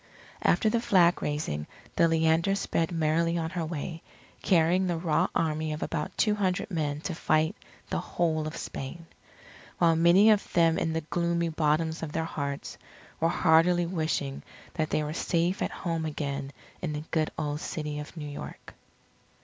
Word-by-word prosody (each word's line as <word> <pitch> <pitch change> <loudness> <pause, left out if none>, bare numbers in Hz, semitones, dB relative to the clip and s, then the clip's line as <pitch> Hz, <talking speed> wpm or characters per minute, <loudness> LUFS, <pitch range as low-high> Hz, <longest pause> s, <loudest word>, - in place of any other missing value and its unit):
After 220 - +3
the 230 +2 +2
flag 180 -6 +4
raising 145 - -2 0.3
the 170 - +5
Leander 165 +3 +2
sped 165 -4 -1
merrily 165 +1 +1
on 160 -1 -2
her 175 -3 -2
way, 160 +1 -5 0.4
carrying 180 +1 +3
the 175 -2 0
raw 160 -2 +1
army 155 -1 0
of 150 - -4
about 150 -3 -3
two 210 - +3
hundred 200 0 -1
men 150 -3 -1
to 175 - -3
fight 155 0 +1 0.4
the - - 0
whole 155 -3 -1
of 155 - -6
Spain. 150 +5 -6 0.7
While 165 -1 +4
many 175 +6 +6
of 210 -1 +1
them 165 -2 +4
in 160 - -1
the 160 - -1
gloomy 170 +1 0
bottoms 160 +1 0
of 155 -2 -5
their 160 - -1
hearts, 140 -3 -4 0.4
were 165 - +2
heartily 175 +1 +4
wishing 155 -5 -2 0.3
that 155 -2 -1
they 155 0 +1
were 150 +1 -3
safe 170 +3 0
at - - +1
home 165 -3 -3
again 140 -2 -3 0.3
in 165 -4 -2
the 150 0 -4
good 155 -2 +1
old 150 -1 -2
City 150 -2 -4
of 150 +3 -9
New 150 -2 -5
York. 145 - -8
160 Hz, 170 wpm, -28 LUFS, 155-170 Hz, 0.7 s, many